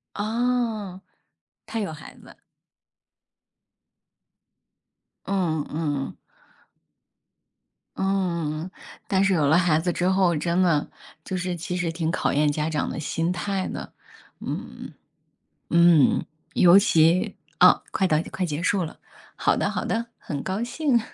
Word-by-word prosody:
哦， 220 -3 -1 0.6
她 225 - -4
有 200 -6 -3
孩 155 - -12
子？ - - -16 2.9
嗯 170 -6 -1
嗯。 145 -3 -3 1.8
嗯。 175 -4 -1 0.4
但 190 0 +2
是 195 0 +3
有 155 -5 +2
了 155 +4 +5
孩 170 -3 +3
子 175 +2 0
之 175 +1 -1
后， 190 -2 +3
真 170 +4 0
的， 165 -5 +2 0.4
就 190 - -4
是 180 0 -2
其 170 +1 -4
实 180 -2 -1
挺 165 -1 -2
考 - - 0
验 150 +1 +3
家 150 +1 -1
长 150 -2 -1
的 - - -5
心 165 +3 -1
态 190 +1 -2
的， - - -7 0.5
嗯。 - - -7 0.8
嗯， 170 -4 +5 0.3
尤 175 +1 +7
其 185 +2 +3 0.2
啊， 180 0 +7
快 190 - +1
到 155 -4 +2
快 185 - -2
结 150 -1 -3
束 185 +1 +1
了， 160 - -8 0.4
好 - - +2
的 - - 0
好 - - -3
的， 230 +1 -1
很 140 -3 -5
高 190 +3 -2
兴， 250 +1 +1
180 Hz, 140 characters per minute, -24 LUFS, 160-195 Hz, 2.9 s, 尤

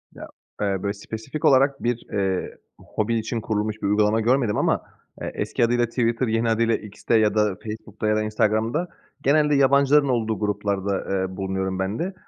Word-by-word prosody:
Ya, - - -9 0.3
eee, 100 -2 -1
böyle 100 0 -1
spesifik 110 +8 -6
olarak 135 +1 +4
bir, 120 0 -1
eee, 95 -2 -1 0.2
hobi 110 +2 -2
için 115 +1 -3
kurulmuş 110 -1 -2
bir - - 0
uygulama 105 +2 +2
görmedim 120 -2 +2
ama, - - +1 0.4
eee, - - -4
eski 120 - 0
adıyla 120 +1 +2
Twitter, 120 +1 0
yeni 115 +1 +1
adıyla 115 0 +2
X'te 105 +2 -3
ya 105 -1 +2
da 105 -3 +2
Facebook'ta 110 -1 -5
ya 105 - +3
da 110 - +1
Instagram'da 110 +9 0 0.3
genelde 150 +1 +3
yabancıların 140 +1 +4
olduğu 110 -3 0
gruplarda, 100 -1 -1
eee, 95 -1 -2
bulunuyorum 95 -1 -2
ben 95 +3 -2
de. 185 +3 -2
110 Hz, 170 wpm, -23 LUFS, 105-120 Hz, 0.4 s, olarak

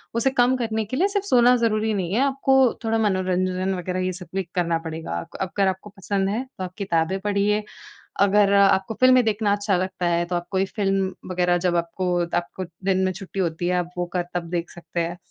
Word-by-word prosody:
उसे 235 +3 +2
कम 250 0 +3
करने 220 -3 -1
के 255 +6 -4
लिए 380 - +3
सिर्फ 405 -1 -1
सोना 250 -8 +5
ज़रूरी 220 -2 +1
नहीं 185 -2 -2
है, 225 - +2
आपको 270 -1 +2 0.3
थोड़ा 225 0 +1
मनोरंजन 185 -2 0
वगैरह, 180 +1 -3
ये 185 - -1
सब 180 -1 -9
भी 195 - 0
करना 170 -2 +1
पड़ेगा। 160 - -5
अग - - -11
अगर 195 +1 0
आपको 190 +2 -6
पसंद 195 0 -1
है, 220 +5 -1
तो 185 - -4
आप 180 - -9
किताबें 185 -2 0
पढ़िए, 205 +1 +1 0.6
अगर 200 0 +4
आपको 195 +1 +4
फ़िल्में 255 -1 +6
देखना 210 -1 +1
अच्छा 205 -2 0
लगता 185 -1 -2
है, 170 0 +1
तो 175 0 -3
आप 175 - -6
कोई 190 0 +1
फ़िल्म 195 -1 -1 0.2
वगैरह, 180 -1 +2
जब 175 - +1
आपको 170 +2 -2 0.3
आपको 185 +2 -4 0.2
दिन 190 -1 +2
में 185 - +1
छुट्टी 195 +2 -7
होती 175 -1 -1
है, 180 - +1
आप 175 -1 -2
वो 175 - 0
कर 175 -1 0
तब 170 -1 -3
देख 175 -1 -2
सकते 170 0 -6
हैं। 170 +1 -3
190 Hz, 215 wpm, -23 LUFS, 180-215 Hz, 0.6 s, फ़िल्में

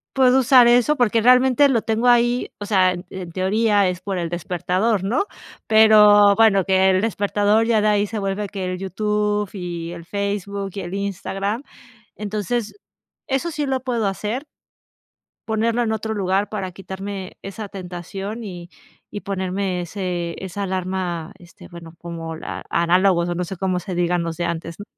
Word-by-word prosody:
puedo 260 -1 +5
usar 250 -1 +6
eso, 245 +5 +4
porque 230 -4 +2
realmente 255 +3 +5
lo 235 -5 +1
tengo 225 +2 0
ahí, 240 0 +3
o 205 - -5
sea, 190 -3 +3
en 175 +1 -8
en 180 -3 -7
teoría 200 +2 +2
es 180 0 -3
por 195 -1 -3
el 170 -1 -2
despertador, 180 +4 -1
¿no?, 235 - 0 0.4
pero 210 -2 +7
bueno, 200 -4 +4
que 190 0 +3
el 185 0 +3
despertador 210 0 +1
ya 225 -2 +3
de 215 - +2
ahí 205 0 +2
se 225 - -5
vuelve 200 +1 -2
que 195 -2 -4
el 185 0 -3
YouTube, 210 +1 -1
y 175 -3 -5
el 170 -1 -9
Facebook, 200 0 -3
y - - -5
el 175 0 -7
Instagram, 200 +3 -3 0.5
entonces, 215 +2 -3 0.5
eso 270 +5 -1
sí 300 -2 -2
lo 265 -1 -1
puedo 240 -5 -1
hacer 210 - -3 1.0
ponerlo 225 +2 +1
en 225 -2 0
otro 220 0 -3
lugar 195 0 0
para 190 -4 -4
quitarme 190 0 -7
esa 200 +1 -7
tentación, 195 +4 -6
y 175 -4 -8 0.4
y 205 - -6
ponerme 190 -1 -2
ese 175 -1 -4
esa 195 +2 -4
alarma, 185 -3 -3
este, 175 -2 -15
bueno, 170 -2 -11
como 165 -1 -6
la - - -7
análogos 175 +1 +2
o 175 - -2
no 180 0 -2
sé, 190 - -6
cómo 185 0 -1
se 180 0 -6
digan 175 0 +1
los 165 -1 -4
de 175 - -3
antes, 170 0 -4
¿no? 205 - -8
200 Hz, 175 wpm, -21 LUFS, 180-220 Hz, 1.0 s, pero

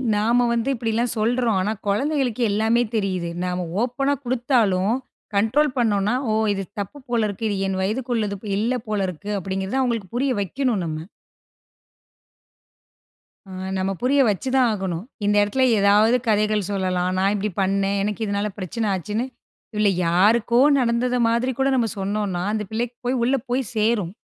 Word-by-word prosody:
நாம 235 +4 +3
வந்து 235 +3 0
இப்டில்லாம் 230 0 -1
சொல்றோம். 230 -1 +1
ஆனா 210 +3 0
கொழந்தைகளுக்கு 255 +3 0
எல்லாமே 220 +3 +2
தெரியுது. 185 -5 -1
நாம 180 0 -2 0.2
ஓப்பனா 275 +3 0
குடுத்தாலும் 235 -6 +1 0.4
கண்ட்ரோல் 255 +9 +2
பண்னோம்னா, 210 -2 +2 0.2
ஓ - - +1 0.2
இது 195 -1 -3 0.2
தப்பு 200 +8 -5
போலருக்கு, 225 -2 -1
இது 205 - -1
என் 190 -1 -2
வயதுக்கு 240 +6 -1
உள்ளது 210 -3 -1 0.2
இல்ல 225 +5 +1
போலருக்கு, 200 -2 -3
அப்டின்றத 190 +6 -2
அவங்களுக்கு 230 -7 -1
புரிய 260 +1 +1
வைக்கனும் 225 0 -1
நம்ம. 160 +1 -5 2.4
ஆ - - -16 0.3
நம்ம 190 +1 -1
புரிய 275 +3 +3
வச்சு 210 +6 -2
தான் 255 -2 +4
ஆகணும். 190 -4 -3 0.2
இந்த 205 0 +2
எடத்ல 235 +6 0 0.2
ஏதாவது 210 +4 +5
கதைகள் 210 -2 +2
சொல்லலாம், 185 -2 0
நான் 195 +2 +2
இப்டி 210 +1 -1
பண்னேன் 195 +1 +1
எனக்கு 210 +2 -2
இதனால 200 +1 -1
பிரச்சனை 215 +4 -3
ஆச்சுன்னு, 210 +6 -2 0.5
இதுல 210 -1 +3 0.2
யாருக்கோ 215 +7 +3 0.2
நடந்தது 245 0 +1
மாதிரி 235 +3 +1
கூட, 270 - +3
நாம் 230 -4 0
சொன்னோன்னா 195 -2 -2
அந்த 215 -1 -2
பிள்ளைக்கு 240 +2 -2
போய் 250 +1 0
உள்ள 255 +3 +2
போய் 255 +2 +1
சேரும். 215 -5 +1
215 Hz, 145 wpm, -22 LUFS, 195-240 Hz, 2.4 s, ஏதாவது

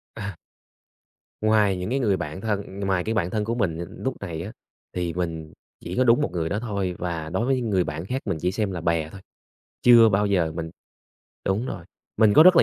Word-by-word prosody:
Ờ. 105 -2 -4 1.1
Ngoài 105 -3 +3
những 90 +4 -4
cái 135 - +1
người 105 -7 +2
bạn 80 +1 -5
thân 100 -2 -3
ngoài 95 -3 0
cái 110 - -1
bạn 90 -5 0
thân 105 +1 -1
của 115 +2 -1
mình, 95 -9 -1
ờ, 85 - -3 0.2
núc 130 - -1
này 85 -5 -5
á 100 +5 -7 0.4
thì 85 -2 -1
mình 80 -3 -4 0.3
chỉ - - -6
có 130 - +4
đúng 120 +3 +5
một 95 - -1
người 80 -2 -1
đó 100 - -1
thôi 100 -5 -2
và 80 -3 -3
đối 115 - 0
với 135 0 +2
những 120 -3 -2
người 95 -3 +2
bạn 80 +2 -4
khác 130 +6 -2
mình 95 -6 -1
chỉ 90 +2 0
xem 105 0 -1
là 90 - -4
bè 85 -1 0
thôi. 100 - -11 0.6
Chưa 120 -2 +8
bao 105 0 +2
giờ 90 -5 +1
mình 80 -1 -4 0.8
đúng 100 +6 0
rồi, 85 - -6 0.3
mình 110 -1 +5
có 155 - +9
rất 180 +1 +7
là - - +8
95 Hz, 235 wpm, -24 LUFS, 85-110 Hz, 1.1 s, có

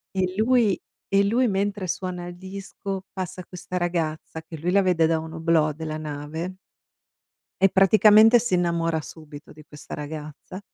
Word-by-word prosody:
E 190 - +1
lui 225 -4 +3 0.3
e 195 0 +3
lui 235 +5 +2
mentre 200 -1 -1
suona 180 0 -4
il 175 0 -9
disco, 195 0 -7
passa 185 -1 -5
questa 180 0 -6
ragazza, 165 -2 -2
che 160 - -9
lui 165 +4 -2
la 200 +1 +4
vede 170 -3 +3
da 165 0 +2
un 160 0 -8
oblò 160 -2 +2
della 155 0 -5
nave 155 +4 -5 1.1
e 195 - +6
praticamente 215 +4 +6
si 230 -4 0
innamora 170 -2 0
subito 150 -1 -12
di 155 - -14
questa 150 0 -11
ragazza. 150 +4 -7
175 Hz, 155 wpm, -24 LUFS, 160-195 Hz, 1.1 s, e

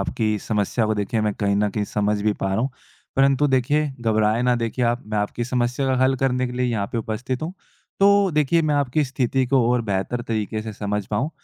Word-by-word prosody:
आपकी 105 +1 -1
समस्या 105 +2 -1
को 110 - +1
देखिए 105 +2 -1
मैं 105 -1 0
कहीं 100 -1 0
न 105 0 +2
कहीं 105 +1 -2
समझ 105 0 -1
भी 105 0 +2
पा - - 0
रहा 95 +3 0
हूँ, 130 +2 0 0.5
परंतु 135 +1 +4
देखिए 140 +4 +2
घबराएँ 110 0 +2
ना 125 0 +3
देखिए 120 +1 -1
आप, 120 +2 0
मैं 105 -1 -2
आपकी 105 +3 -2
समस्या 125 +2 -1
का 130 - +2
हल 130 +1 +3
करने 130 -1 0
के 125 - -6
लिए 125 0 0
यहाँ 110 -4 -1
पे 115 - -1
उपस्थित 120 +5 -3
हूँ। 170 +3 -3 0.5
तो 200 -1 +5
देखिए 150 +3 +3
मैं 150 -1 +1
आपकी 145 +1 +1
स्थिति 130 0 0
को 130 -1 +3
और 125 -1 +2
बेहतर 100 +4 -2
तरीके 110 -1 -2
से 110 -1 -6
समझ 105 0 -3
पाऊँ, 125 +9 -1
120 Hz, 225 wpm, -22 LUFS, 105-130 Hz, 0.5 s, तो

